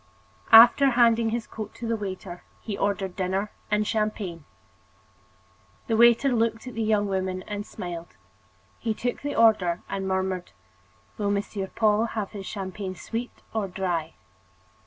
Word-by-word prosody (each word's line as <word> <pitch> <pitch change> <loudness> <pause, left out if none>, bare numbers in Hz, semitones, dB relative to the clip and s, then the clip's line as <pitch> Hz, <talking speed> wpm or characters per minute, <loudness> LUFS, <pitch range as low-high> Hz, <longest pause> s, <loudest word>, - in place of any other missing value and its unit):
After 240 +5 +9
handing 235 -2 +4
his 230 0 -2
coat 215 -1 -8
to 235 - -6
the 230 - +1
waiter, 190 -3 -6 0.2
he 210 - -5
ordered 195 -2 -1
dinner 190 +2 -1 0.2
and 210 0 +1
champagne. 210 -7 -2 1.4
The 225 - 0
waiter 235 +4 +5
looked 230 -2 0
at 250 - -7
the 225 - -3
young 215 -1 +2
woman 185 -1 -2
and 205 0 -5
smiled. 170 -1 -7 0.6
He 225 -2 -2
took 245 +2 -3
the 290 0 -3
order 205 -7 +3
and 195 -1 -3
murmured: 190 -1 -2 0.7
"Will 205 -1 0
Monsieur 200 -1 -2
Paul 215 +1 +2
have 205 -3 -2
his 200 -3 -7
champagne 190 -1 -5
sweet 235 +6 -6
or 220 -3 -1
dry?" 175 -4 -3
205 Hz, 145 wpm, -26 LUFS, 190-225 Hz, 1.4 s, After